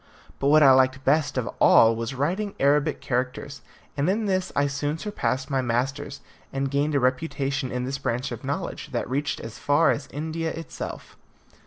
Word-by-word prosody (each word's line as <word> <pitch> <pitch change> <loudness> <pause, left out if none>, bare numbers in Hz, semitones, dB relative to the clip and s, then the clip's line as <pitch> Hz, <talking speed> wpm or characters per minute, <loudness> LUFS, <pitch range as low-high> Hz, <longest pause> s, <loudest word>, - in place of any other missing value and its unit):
But 140 - 0
what 155 +1 +6
I 135 - +8
liked 130 0 +3
best 145 0 +2
of 125 - -1
all 115 0 +6
was 115 +3 -4
writing 185 +10 -1
Arabic 145 +2 +2
characters, 130 +2 -3 0.3
and 145 +4 +1
in 215 +3 0
this 185 -2 0
I 140 - +3
soon 145 +2 -2
surpassed 155 -9 -2
my 135 -1 +1
masters, 130 +3 -2 0.3
and 135 0 -2
gained 145 +2 +1
a - - +4
reputation 135 0 -1
in 125 0 -2
this 135 +2 -3
branch 125 +1 -2
of 120 - -7
knowledge - - -4
that - - -1
reached 145 +4 -2
as 115 -1 -8
far 145 +3 +3
as 140 -2 -4
India 160 +3 -3
itself. 165 -1 -7
140 Hz, 180 wpm, -25 LUFS, 130-155 Hz, 0.3 s, I